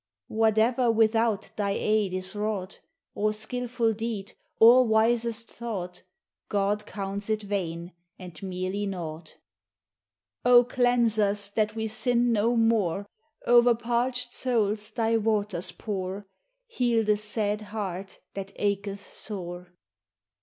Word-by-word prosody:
Whate'er 225 +3 +2
without 225 -1 +2
thy 200 -2 0
aid 215 -3 +1
is 185 +2 -3
wrought, 205 -3 -3 0.3
Or 215 +1 +1
skilful 235 +1 -1
deed, 220 -2 -4 0.3
or 240 +3 +8
wisest 230 0 +1
thought, 190 -7 -5 0.5
God 205 +1 0
counts 200 +1 -5
it 215 -1 0
vain 175 -4 -3 0.2
and 180 -2 -11
merely 190 +2 -3
naught. 170 -4 -6 1.1
O 245 0 +7
cleanse 245 -3 +2
us 205 -1 +1
that 215 +1 0
we 220 0 -2
sin 240 +2 +1
no 225 +3 +2
more. 215 -5 +2 0.4
O'er 240 0 +6
parched 245 +2 -1
souls 215 -4 0
thy 225 0 +1
waters 205 -5 -1
pour; 195 0 -5 0.4
Heal 240 - +1
the 210 0 +3
sad 210 0 -1
heart 195 -3 -6
that 195 0 -6
acheth 200 0 -1
sore. 180 -3 -7
215 Hz, 120 wpm, -27 LUFS, 195-230 Hz, 1.1 s, or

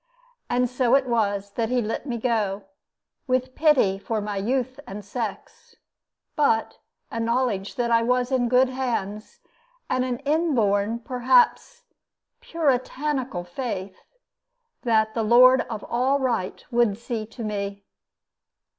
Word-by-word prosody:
And 250 +1 +2
so 250 0 +2
it 275 -1 +3
was 205 -4 0
that 225 +2 -2
he 250 0 +1
let 225 +5 -3
me 240 -3 -2
go, 215 -4 -1 0.6
with 255 0 0
pity 260 -12 +3
for 220 +2 -2
my 205 0 -4
youth 255 +5 -1
and 200 +1 -8
sex, 215 -1 -6 0.6
but 225 -7 +1 0.3
a 230 - -3
knowledge 230 -4 -1
that 240 -1 -1
I 230 0 +4
was 250 +2 +1
in 245 -2 +1
good 255 +1 +4
hands, 230 -5 -4 0.5
and 255 - +1
an 250 -1 -2
inborn, 235 -9 +1
perhaps 475 - +2 0.6
"Puritanical" 275 - -1
faith, 190 -1 -5 0.8
that 220 -3 +2
the 230 - -1
Lord 250 +3 +6
of 220 -3 -5
all 260 +4 +1
right 235 -8 -2
would 235 -4 +2
see 230 -2 -5
to 230 +1 -9
me. 200 -1 -4
235 Hz, 130 wpm, -24 LUFS, 210-255 Hz, 0.8 s, Lord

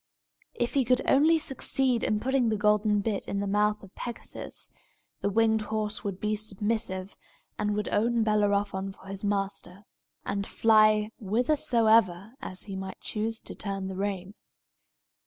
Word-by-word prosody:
If 240 - -1
he 275 - +3
could 250 +2 +2
only 310 +4 +5
succeed 270 -4 0
in 215 - +1
putting 260 0 +1
the 215 - 0
golden 210 0 +3
bit 205 -1 -2
into 200 - -2
the 200 - -2
mouth 210 +1 +1
of 195 - -14
Pegasus, 240 -1 -6 0.5
the 200 - +1
winged 220 +1 +3
horse 215 0 -2
would 195 -2 -4
be 215 0 0
submissive, 205 -2 -2 0.4
and 210 0 0
would 210 0 -2
own 230 +2 +2
Bellerophon 205 -2 +1
for - - -18
his 195 +1 -6
master, 200 -1 -3 0.4
and 200 0 -2
fly 215 -1 +4
whithersoever 225 - +2 0.3
he 195 -2 -6
might 190 0 -6
choose 225 +1 -2
to - - -7
turn 195 -2 -4
the 190 - -5
rein. 195 -1 -3
210 Hz, 150 wpm, -28 LUFS, 200-225 Hz, 0.5 s, only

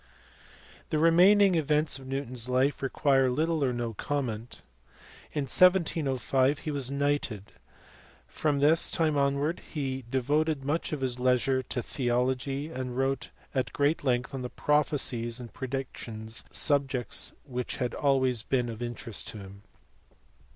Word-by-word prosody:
The 155 - 0
remaining 185 +5 +6
events 150 -2 +1
of 135 - -12
Newton 135 -1 -4
s 125 0 -3
life 130 +3 +1
require 135 -1 +2
little 155 +3 0
or 130 - +2
no 120 -2 -3
comment. 120 -2 -4 0.7
In 150 - -1
1705 140 - +3
he 155 - -5
was 140 -3 -1
knighted. 140 -7 -1 0.7
From 145 -2 -1
this 160 +3 +6
time 155 -2 +1
onwards 140 +3 0
he 135 -4 -3
devoted 145 +3 0
much 150 +4 -1
of 150 -3 -3
his 125 -2 -1
leisure 130 +1 +2
to 125 -1 -4
theology, 130 +4 -1
and 130 -3 -5
wrote 135 -1 -1 0.2
at 125 -5 -1
great 145 +2 +1
length 125 -2 0
on 125 -2 -4
prophecies 130 -6 +1
and 120 -2 -9
predictions, 120 -4 -6
subjects 135 -4 +1
which 125 -3 -4
had 125 -2 -2
always 130 -4 +1
been 125 +1 -1
of 115 0 -7
interest 120 -2 -5
to - - -7
him. 100 0 -11
135 Hz, 135 wpm, -28 LUFS, 125-145 Hz, 0.7 s, remaining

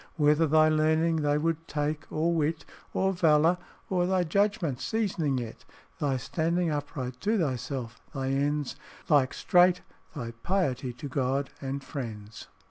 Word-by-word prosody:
Whether 150 +1 +4
thy 155 +1 +5
learning 155 +1 +2
they 145 -1 +2
would 165 +1 -1
take, 150 +1 -2
or 165 +2 +1
wit, 160 0 0 0.3
Or 190 0 +1
valour, 165 0 +4 0.3
or 180 -2 +1
thy 185 -1 +2
judgment 175 - 0
seasoning 170 -6 0
it, 120 -3 -6 0.4
Thy 140 -3 +1
standing 165 +5 0
upright 135 -4 -4
to 220 +2 +1
thyself, 125 - -3
thy 135 -3 -3
ends 145 +1 0 0.3
Like 140 -4 +4
straight, 180 0 +4 0.3
thy 115 -1 -4
piety 135 -10 0
to 135 +4 -7
God 135 +1 -1
and 135 0 -4
friends." 115 -7 -7
150 Hz, 140 wpm, -28 LUFS, 135-165 Hz, 0.4 s, thy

